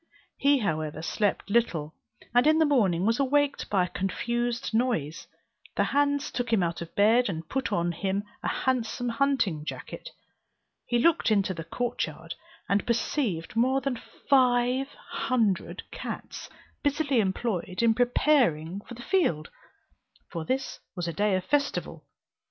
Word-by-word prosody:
He 280 Hz, +1 st, +4 dB
however 155 Hz, -, -2 dB
slept 205 Hz, +3 st, 0 dB
little, 170 Hz, -10 st, +1 dB, 0.4 s
and 245 Hz, +4 st, +5 dB
in 310 Hz, +1 st, +5 dB
the 320 Hz, -, +5 dB
morning 200 Hz, -, +2 dB
was 230 Hz, +3 st, +2 dB
awaked 285 Hz, +1 st, +1 dB
by 195 Hz, -3 st, +3 dB
a -, -, -8 dB
confused 235 Hz, +5 st, -2 dB
noise. 220 Hz, -, 0 dB, 0.5 s
The -, -, +3 dB
hands 285 Hz, 0 st, +1 dB
took 245 Hz, -1 st, -3 dB
him 210 Hz, -5 st, +3 dB
out 170 Hz, 0 st, -2 dB
of 170 Hz, -, -8 dB
bed, 225 Hz, +3 st, +4 dB
and 160 Hz, -3 st, -5 dB
put 270 Hz, +5 st, -2 dB
on 175 Hz, 0 st, +1 dB
him 195 Hz, +3 st, -2 dB, 0.2 s
a -, -, -3 dB
handsome 245 Hz, -1 st, -1 dB
hunting 230 Hz, -, +1 dB
jacket. -, -, -7 dB, 0.8 s
He 240 Hz, -, +2 dB
looked 315 Hz, +4 st, +3 dB
into 200 Hz, -3 st, +2 dB
the 165 Hz, -2 st, -6 dB
court 240 Hz, +9 st, -2 dB
yard, -, -, -8 dB, 0.3 s
and 200 Hz, +1 st, +1 dB
perceived 230 Hz, -, -1 dB
more 260 Hz, +4 st, +3 dB
than 270 Hz, -3 st, -3 dB, 0.3 s
five 255 Hz, 0 st, +3 dB
hundred 230 Hz, -8 st, -1 dB
cats, -, -, -6 dB, 0.3 s
busily 285 Hz, -3 st, +1 dB
employed 190 Hz, -1 st, -1 dB
in 230 Hz, -1 st, +5 dB
preparing 240 Hz, -, +2 dB
for 240 Hz, -, -11 dB
the 240 Hz, -, -10 dB
field, 220 Hz, -, +1 dB, 0.8 s
for 165 Hz, -, -4 dB
this 265 Hz, +5 st, -2 dB, 0.2 s
was 175 Hz, -2 st, -3 dB
a 170 Hz, -, -2 dB
day 205 Hz, +1 st, +2 dB
of 185 Hz, -, -1 dB
festival. 285 Hz, -1 st, -1 dB
230 Hz, 150 wpm, -27 LUFS, 185-265 Hz, 0.8 s, and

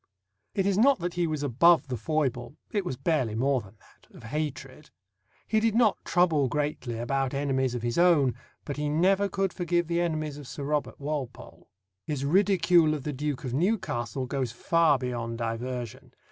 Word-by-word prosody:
It 195 Hz, -, +1 dB
is 200 Hz, 0 st, +2 dB
not 275 Hz, +4 st, +5 dB
that 175 Hz, -1 st, -3 dB
he 175 Hz, -1 st, 0 dB
was 155 Hz, -2 st, -3 dB
above 145 Hz, +3 st, +4 dB
the 130 Hz, -, -3 dB
foible 135 Hz, -2 st, -2 dB, 0.2 s
it 205 Hz, -2 st, 0 dB
was 130 Hz, -8 st, -4 dB
barely 135 Hz, -6 st, 0 dB
more 130 Hz, +2 st, +1 dB
than 105 Hz, +1 st, -16 dB
that -, -, -25 dB
of -, -, -13 dB
hatred. 145 Hz, +2 st, -5 dB, 0.6 s
He 220 Hz, -, +2 dB
did 225 Hz, 0 st, +1 dB
not 230 Hz, -3 st, +3 dB
trouble 165 Hz, -6 st, +2 dB
greatly 145 Hz, -4 st, -2 dB
about 135 Hz, +3 st, -1 dB
enemies 130 Hz, -3 st, 0 dB
of 120 Hz, -, -4 dB
his 120 Hz, +5 st, -1 dB
own, 160 Hz, -8 st, +4 dB, 0.3 s
but 145 Hz, -, -5 dB
he 150 Hz, 0 st, -1 dB
never 190 Hz, +6 st, +2 dB
could 195 Hz, -1 st, -1 dB
forgive 175 Hz, -1 st, 0 dB
the 170 Hz, +1 st, 0 dB
enemies 155 Hz, -3 st, -2 dB
of 145 Hz, -, -10 dB
Sir 140 Hz, -, -7 dB
Robert 150 Hz, +1 st, -2 dB
Walpole. 140 Hz, -4 st, -6 dB, 0.3 s
His 140 Hz, -3 st, -3 dB
ridicule 175 Hz, -2 st, +4 dB
of 145 Hz, -, -6 dB
the 150 Hz, -, -3 dB
Duke 145 Hz, 0 st, -3 dB
of 125 Hz, -2 st, -4 dB
Newcastle 140 Hz, -, -1 dB
goes 130 Hz, -2 st, -2 dB
far 160 Hz, +5 st, +3 dB
beyond 120 Hz, -2 st, -4 dB
diversion. 120 Hz, +1 st, -5 dB
145 Hz, 180 wpm, -27 LUFS, 130-175 Hz, 0.6 s, not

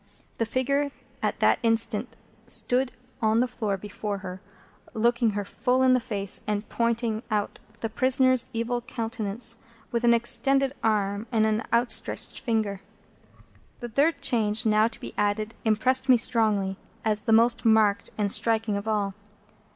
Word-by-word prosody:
The 230 Hz, -, 0 dB
figure 275 Hz, +4 st, 0 dB, 0.3 s
at -, -, -2 dB
that -, -, +4 dB
instant 225 Hz, -1 st, 0 dB, 0.3 s
stood 255 Hz, +1 st, +3 dB, 0.3 s
on 220 Hz, 0 st, +2 dB
the 250 Hz, -, +2 dB
floor 210 Hz, -5 st, -3 dB
before 205 Hz, +1 st, -5 dB
her, 185 Hz, +1 st, -7 dB, 0.5 s
looking 235 Hz, 0 st, +2 dB
her 205 Hz, -, -2 dB
full 250 Hz, +5 st, 0 dB
in 260 Hz, 0 st, +5 dB
the 255 Hz, -, +3 dB
face, 200 Hz, -4 st, -1 dB
and 210 Hz, 0 st, -2 dB
pointing 230 Hz, -1 st, -1 dB
out 210 Hz, -2 st, -2 dB, 0.2 s
the 225 Hz, -, -1 dB
prisoner's 255 Hz, +2 st, +4 dB
evil 235 Hz, +1 st, -2 dB
countenance 230 Hz, -1 st, -3 dB, 0.3 s
with 235 Hz, 0 st, -1 dB
an 235 Hz, 0 st, +5 dB
extended 270 Hz, +3 st, +1 dB
arm 205 Hz, 0 st, 0 dB
and 220 Hz, -2 st, +2 dB
an 215 Hz, 0 st, 0 dB
outstretched 235 Hz, +1 st, 0 dB
finger. 215 Hz, -6 st, -2 dB, 1.0 s
The 240 Hz, -, -6 dB
third 280 Hz, +4 st, +1 dB
change 220 Hz, -3 st, +1 dB
now 215 Hz, 0 st, +4 dB
to 230 Hz, -, -7 dB
be -, -, -8 dB
added 210 Hz, +2 st, -1 dB
impressed 255 Hz, +5 st, +2 dB
me 255 Hz, -, +7 dB
strongly 210 Hz, -5 st, +1 dB, 0.3 s
as 215 Hz, -1 st, 0 dB
the 225 Hz, -, -2 dB
most 230 Hz, +2 st, +4 dB
marked 220 Hz, -3 st, +3 dB
and 205 Hz, -2 st, +1 dB
striking 225 Hz, -2 st, +1 dB
of 200 Hz, +2 st, -6 dB
all. 205 Hz, -2 st, -1 dB
225 Hz, 150 wpm, -26 LUFS, 210-245 Hz, 1.0 s, me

